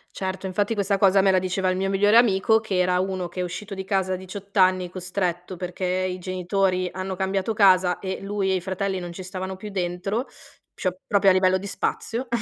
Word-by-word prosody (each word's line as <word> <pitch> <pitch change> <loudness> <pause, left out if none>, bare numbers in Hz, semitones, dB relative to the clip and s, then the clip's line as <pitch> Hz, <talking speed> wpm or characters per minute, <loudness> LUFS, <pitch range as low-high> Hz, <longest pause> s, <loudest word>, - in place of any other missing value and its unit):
Certo, 190 0 -4
infatti 205 +4 0
questa 200 -1 +1
cosa 195 0 +5
me 195 - +3
la 185 - +3
diceva 185 +1 -1
il 185 - 0
mio 195 0 0
migliore 205 +3 +4
amico, 220 -1 +4
che 210 -4 -3
era 180 0 +2
uno 185 -1 -2
che 180 +1 -5
è - - 0
uscito 195 +3 -6
di 190 - -5
casa 190 -1 0
a - - 0
18 195 +2 -8
anni 185 -1 +3
costretto, 180 -1 -3
perché 180 +1 -4
i 185 0 -1
genitori 185 0 0
hanno 185 0 -4
cambiato 190 +3 -1
casa 185 -3 +4
e 190 -1 -4
lui 195 -1 -1
e - - +2
i 180 - -1
fratelli 190 0 -2
non 175 -1 -7
ci 185 - -8
stavano 185 +1 -5
più 210 +3 -8
dentro, 195 +5 -2 0.5
cio 185 -1 -2
proprio 200 -1 +4
a - - +4
livello 185 0 +3
di 195 - -8
spazio 235 +5 -3
190 Hz, 215 wpm, -24 LUFS, 185-195 Hz, 0.5 s, cosa